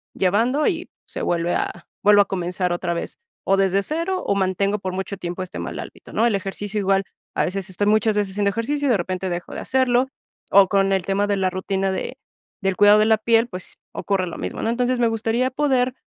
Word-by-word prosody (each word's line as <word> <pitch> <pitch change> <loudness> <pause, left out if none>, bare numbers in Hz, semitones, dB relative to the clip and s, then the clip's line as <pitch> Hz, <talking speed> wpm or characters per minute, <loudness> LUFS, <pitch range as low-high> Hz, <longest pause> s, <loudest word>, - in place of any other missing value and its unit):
llevando 230 +10 +2
y 345 -1 -2 0.2
se - - -6
vuelve 170 0 0
a, - - -3 0.2
vuelvo 205 0 +7
a - - +3
comenzar 180 -1 -2
otra 175 0 -2
vez, 170 - -4 0.3
o 195 - +3
desde 195 0 +2
cero 335 - -1
o 200 - +1
mantengo 195 +2 +1
por 185 -1 -4
mucho 190 +1 -4
tiempo 175 0 -5
este 185 - -8
mal - - -5
hábito, - - -10
¿no?, 230 - +2
el 215 - +1
ejercicio 200 +2 -3
igual, 195 0 +2 0.3
a - - +2
veces 190 +1 -3
estoy 205 +3 -1
muchas 215 0 +3
veces 195 -2 0
haciendo 200 0 +1
ejercicio 285 +7 -1
y 255 - +3
de 215 - +4
repente 185 +1 -3
dejo 175 0 -5
de - - -5
hacerlo, 255 -1 +2 0.4
o 195 -1 +7
con 195 -1 +2
el 190 -2 0
tema 200 +1 +1
de 205 - +1
la 190 -1 +1
rutina 190 +1 -1
de - - -4 0.4
del 195 -1 0
cuidado 205 +1 +7
de 215 - +4
la 220 0 +4
piel, 230 +2 +3
pues 185 -4 -7
ocurre 190 -3 -1
lo 170 - -6
mismo, - - -5
¿no?, 225 - 0
entonces, 250 +1 0
me 235 - +4
gustaría 225 +3 0
poder 260 -3 +1
200 Hz, 225 wpm, -22 LUFS, 190-230 Hz, 0.4 s, vuelvo